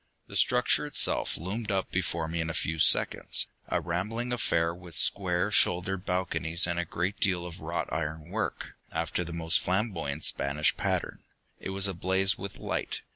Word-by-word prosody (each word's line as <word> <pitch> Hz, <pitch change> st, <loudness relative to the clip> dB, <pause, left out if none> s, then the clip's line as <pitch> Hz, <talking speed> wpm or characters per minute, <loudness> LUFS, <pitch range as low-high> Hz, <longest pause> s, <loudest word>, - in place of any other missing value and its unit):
The -, -, -11 dB
structure -, -, +3 dB
itself -, -, +2 dB
loomed 105 Hz, +6 st, -4 dB
up 95 Hz, -1 st, -1 dB
before 80 Hz, -, -1 dB
me 85 Hz, +1 st, -2 dB
in 80 Hz, -, -3 dB
a 85 Hz, -, -4 dB
few 80 Hz, -1 st, -2 dB
seconds, -, -, +3 dB, 0.2 s
a -, -, 0 dB
rambling 110 Hz, +8 st, -3 dB
affair 85 Hz, -8 st, +1 dB
with 90 Hz, -2 st, -11 dB
square 95 Hz, +1 st, +1 dB
shouldered 90 Hz, 0 st, +2 dB
balconies 90 Hz, -2 st, +1 dB
and 85 Hz, 0 st, -1 dB
a 85 Hz, -, -1 dB
great 90 Hz, +5 st, -3 dB
deal 90 Hz, -4 st, +1 dB
of 85 Hz, -1 st, -9 dB
wrought 85 Hz, +2 st, -3 dB
iron 80 Hz, +2 st, -4 dB
work, 110 Hz, +2 st, -3 dB, 0.2 s
after 80 Hz, +2 st, -2 dB
the 85 Hz, -, -7 dB
most 80 Hz, -1 st, +2 dB
flamboyant 90 Hz, -7 st, -2 dB
Spanish 70 Hz, +2 st, +3 dB
pattern. -, -, -2 dB, 0.4 s
It -, -, -6 dB
was 95 Hz, +1 st, +3 dB
ablaze 95 Hz, +1 st, +2 dB
with 100 Hz, 0 st, -7 dB
light. -, -, -3 dB
90 Hz, 170 wpm, -29 LUFS, 80-95 Hz, 0.4 s, structure